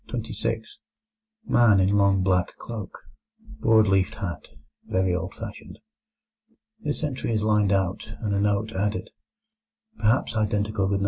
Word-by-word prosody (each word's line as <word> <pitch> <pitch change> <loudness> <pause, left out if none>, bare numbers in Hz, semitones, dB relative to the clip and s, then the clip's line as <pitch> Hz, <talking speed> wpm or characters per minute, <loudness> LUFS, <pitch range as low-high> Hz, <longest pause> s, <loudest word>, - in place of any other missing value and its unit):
Man 115 - +5
in 95 +2 +3
long 100 -1 +3
black 90 -1 +1
cloak, 110 -4 -7 0.6
broad 110 -1 +5
leafed 95 -1 +2
hat, 90 -5 -5 0.4
very 95 -1 +1
old 90 +2 -3
fashioned. 110 -2 -9 1.0
This 150 -7 -3
entry 130 -5 -2
is 105 -1 0
lined 105 -2 +3
out, 95 +2 -1
and 105 -3 -1
a 100 - +1
note 105 +1 +1
added: 105 +1 -2 0.9
"Perhaps 110 +1 +2
identical 105 -1 0
with - - 0
No. 100 - +1
105 Hz, 130 wpm, -25 LUFS, 95-110 Hz, 1.0 s, Man